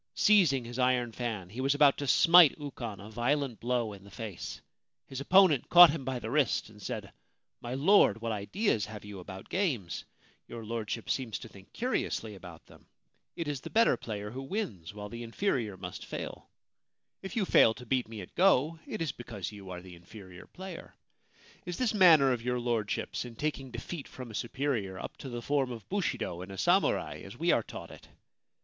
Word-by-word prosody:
Seizing 165 - +4
his 120 +2 -7
iron 125 -2 +2
fan, 110 -5 -4
he 120 +5 -5
was 135 +2 +2
about 145 -1 +6
to 145 - -3
smite 165 +1 +7
Ukon 125 -8 -6
a 105 +2 -10
violent 125 +2 0
blow 120 -3 -1
in 100 -1 -12
the 100 - -14
face. 105 -3 -7 0.5
His 135 0 -6
opponent 180 -4 +5
caught 175 -2 +10
him 150 -3 -4
by 130 0 -2
the 115 -1 -5
wrist, 140 -6 +1
and 105 -1 -16
said: - - -5 0.2
* - - -54
My 120 +1 -4
Lord, 140 - +5
what 115 0 -3
ideas 110 - 0
have 105 -1 -9
you 105 -2 -8
about 95 +1 -9
games? 135 - -2 0.4
Your 115 -1 -8
Lordship 115 0 -4
seems 125 -5 -2
to - - -10
think 95 -1 -16
curiously 225 - -2
about 90 -4 -12
them! - - -19 0.5
It 165 - -4
is 145 -3 -3
the - - -7
better 230 +1 +4
player 105 -2 -6
who 130 +3 -6
wins; 135 - -4
while 105 0 -7
the 115 +3 -8
inferior 115 - -1
must - - -7
fail. - - -7 0.7
If 190 +4 -7
you 215 -4 +1
fail 115 -9 +5
to 125 - -11
beat 125 0 0
me 110 -2 -7
at 90 - -11
go, 165 -4 +3
it - - -3
is 155 - -2
because 110 -6 -7
you 100 -3 -11
are 90 -1 -7
the 95 -1 -11
inferior 90 +1 -13
player. 185 -2 -9 0.7
Is 180 -1 -5
this 245 -4 +1
manner 165 -9 +7
of 120 -2 -1
your 125 +1 -1
Lordship's 115 -4 -2
in 120 -2 -9
taking 140 -1 -3
defeat 130 +6 -6
from 125 -3 -9
a - - -11
superior 115 -5 -2
up - - -7
to 135 - -8
the 120 -1 -5
form 140 -2 0
of 115 -3 -8
bushido 175 - -2
in 95 - -8
a 95 - -8
samurai, 180 - +1
as - - -10
we - - +2
are - - +3
taught - - -9
it - - -14
120 Hz, 200 wpm, -30 LUFS, 105-145 Hz, 0.7 s, caught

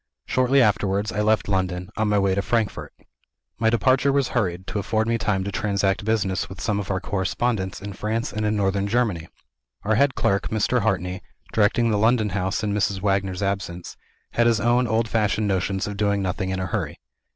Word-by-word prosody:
Shortly 130 +1 +3
afterwards 105 -1 +1
I 105 - -1
left 110 -2 +2
London, 90 -2 -1
on 110 - 0
my 105 0 +2
way 100 -1 +2
to 100 - +1
Frankfort. 110 +1 -1 0.7
My 110 0 +3
departure 130 +4 +3
was 140 -2 +1
hurried, 95 -6 -1
to 105 - -3
afford 110 +2 0
me 115 0 +1
time 95 -3 0
to 100 - -4
transact 100 0 0
business 100 -4 0
with 95 - -9
some 105 -2 -1
of 100 - -5
our 95 -1 0
correspondents 100 +1 -2
in 100 0 -5
France 110 +4 -2
and 110 +1 -2
in 105 0 +1
Northern 100 0 0
Germany. 105 -7 0 0.6
Our 110 - +1
head 135 +4 +3
clerk, 100 0 +1
Mr. 110 +3 +1
Hartrey 95 -4 -1 0.3
(directing 115 +2 +3
the 105 - +1
London 110 -1 +3
house 95 +1 -2
in 105 -1 0
Mrs. 100 -1 0
Wagner's 95 -1 0
absence), 95 -3 -3 0.4
had 120 0 +2
his 115 -2 +3
own 120 +2 +2
old 110 +1 +1
fashioned 105 -1 0
notions 95 0 0
of 105 -1 -5
doing 100 -1 +1
nothing 95 0 -2
in 95 0 -2
a 95 - -2
hurry. 85 - -3
105 Hz, 195 wpm, -23 LUFS, 95-110 Hz, 0.7 s, Shortly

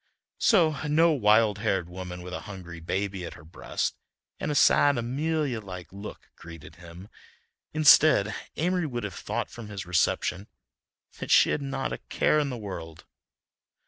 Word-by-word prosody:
So 165 - +3
no 165 +3 +4
wild 110 -5 +3
haired 95 -5 0
woman 90 0 -8
with 90 0 -8
a - - -3
hungry 90 -4 -9
baby 95 +3 -3
at 85 - -7
her - - -14
breast 80 - -4 0.4
and - - -3
a 150 - -1
sad 145 0 +5
Amelia 140 +2 -1
like 90 -3 -9
look 100 +2 -10
greeted 85 -2 -12
him. 85 +2 -12 0.6
Instead, 150 -8 +5 0.2
Amory 180 0 0
would 120 -4 -4
have 100 -2 -5
thought - - -4
from 115 -3 -9
his 100 -3 -7
reception 90 +2 0 0.7
that - - -6
she - - +5
had - - -1
not 135 -1 -3
a - - -5
care 155 - +1
in 145 -2 0
the 125 - -5
world. 85 -7 -8
105 Hz, 160 wpm, -27 LUFS, 90-145 Hz, 0.7 s, sad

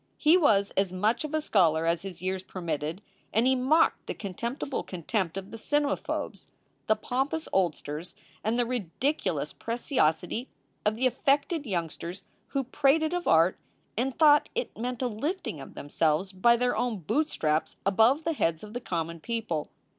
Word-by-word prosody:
He 310 +3 +5
was 215 - +4
as 195 -2 +1
much 210 +9 +1
of 305 - -4
a - - +3
scholar 165 - +3
as 165 0 +1
his 185 -2 -8
years 185 0 -1
permitted, 165 -1 -4 0.3
and 225 +3 +3
he 260 0 +4
mocked 270 +6 +3
the - - -3
contemptible 235 - -3
contempt 185 0 -2
of 195 +1 -6
the 225 - -7
cmemaphobes, 290 +4 -1 0.4
the 215 - +4
pompous 270 +8 -2
oldsters, 170 -3 -1 0.3
and 220 +3 +1
the 245 - +3
ridic 235 -7 -3 0.4
ulous - - -1
preciosity 230 - 0 0.4
of 215 - +2
the 250 +4 0
affected 285 +4 +1
youngsters 170 -1 -4 0.2
who 275 -1 -1
prated 295 +5 +2
of 355 0 -2
art 165 +3 +4 0.4
and 255 +4 -1
thought 295 -2 +6
it 485 - -2
meant 245 +2 -3
a - - +2
lifting 265 - -3
of 135 - -11
themselves 155 +5 0
by 220 +5 +4
their 250 +1 +1
own 245 -3 0
boot 295 - 0
straps 155 0 -1
above 225 +10 +4
the 330 - 0
heads 165 - 0
of 210 0 -9
the 245 - -4
common 170 -4 -3
people. 220 -7 -3
220 Hz, 170 wpm, -28 LUFS, 175-270 Hz, 0.4 s, thought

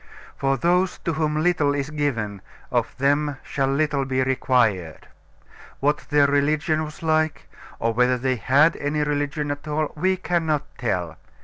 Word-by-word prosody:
For 135 0 0
those 180 +5 +1
to 165 - 0
whom 155 0 0
little 155 -5 +2
is 140 +1 -3
given, 115 -10 -2 0.3
of - - -1
them 145 +1 +1
shall 135 -1 -1
little 140 0 +1
be 130 -1 0
required. 115 - 0 0.7
What 145 +2 +1
their 145 -1 +4
religion 150 +2 +1
was 155 +1 -9
like, 155 -1 0 0.3
or 115 0 0
whether 125 +2 +3
they 130 +1 0
had 140 - +4
any 150 +1 -1
religion 145 0 -1
at 145 +1 -6
all, 150 0 -1
we 185 +4 +1
cannot 165 -5 0 0.2
tell. 90 - -2
145 Hz, 150 wpm, -23 LUFS, 130-155 Hz, 0.7 s, their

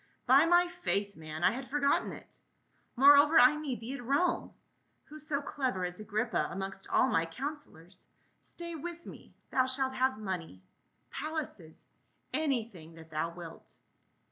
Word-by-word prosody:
" - - -41
By 275 +6 +6
my 350 +1 +5
faith, 205 - -2
man, 155 +1 -7
I - - +5
had 260 +1 -6
forgotten 285 0 +1
it. - - -12 0.6
Moreover, 285 +4 +7
I 255 +4 +7
need 290 -6 -4
thee 235 +4 -5
at 275 - -7
Rome; 285 +8 +1 0.5
who 305 +1 -12
so 300 -1 -2
clever 255 -11 -2
as 180 +2 -5
Agrippa 215 +2 -1
amongst 195 0 -6
all - - +4
my 165 - +2
counselors. 200 - -8 0.3
Stay 340 0 -8
with 340 +2 -7
me, - - -12 0.2
thou 260 -1 +2
shalt 260 0 0
have 260 -1 +1
money 180 - -5 0.2
— - - -44
palaces 295 - -6 0.2
— - - -42
anything 225 - -2
that 160 0 -14
thou 155 +2 -1
wilt." 170 -1 -11
255 Hz, 160 wpm, -31 LUFS, 185-295 Hz, 0.6 s, Moreover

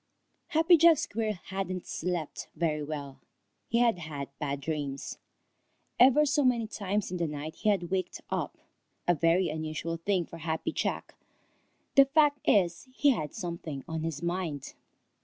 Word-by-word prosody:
_ - - -13
Happy 325 +2 +6
Jack 330 0 +7
Squirrel 220 -6 -1 0.2
hadn't 190 -2 -3
slept 175 -3 -3
very 155 -3 0
well. 145 -2 -6 0.5
He 230 - +1
had 235 -6 +3
had 150 -4 -6
bad 140 -2 -2
dreams. 140 -2 -4 0.8
Ever 270 +4 +7
so 290 0 +2
many 245 -3 +3
times 205 -2 -2
in 180 - -2
the 170 -1 0
night 150 +1 -6
he 215 - +1
had 185 -4 0
waked 185 -2 -1
up, - - -2 0.5
a 175 - +6
very 170 +3 +3
unusual 155 +1 -3
thing 180 +1 0
for 165 - -10
Happy 160 0 -2
Jack. - - -2 0.8
The 275 - +8
fact 290 0 +3
is, 175 +1 +3
he 280 +2 +4
had 155 - -3
something 170 -6 -5
on 160 -1 -3
his 160 -1 -4
mind. 170 -5 -3
175 Hz, 160 wpm, -29 LUFS, 155-220 Hz, 0.8 s, The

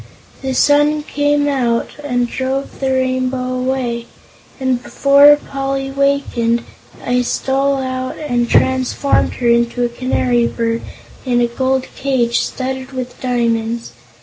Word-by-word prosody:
The 265 -1 -2
sun 295 +2 +3
came 290 0 +1
out 245 -5 0
and 245 -4 0
drove 265 +2 -3
the 270 -1 0
Rainbow 255 -1 0
away, 255 -2 -2 0.5
and 260 -2 0
before 280 +2 +6
Poly 275 -1 -4
wakened, 270 -4 +1 0.4
I 250 0 +2
stole 275 +2 0
out 255 -1 -3
and 245 -6 -1
transformed 260 +2 +2
her 245 - -2
into 235 +1 +2
a - - -1
canary 240 -1 +1
bird 230 0 -2 0.4
in 245 -2 +1
a 240 - +3
gold 260 +2 0
cage 250 -4 +1
studded 260 0 -4
with 255 -1 -6
diamonds. 235 - -1
260 Hz, 125 wpm, -17 LUFS, 240-275 Hz, 0.5 s, before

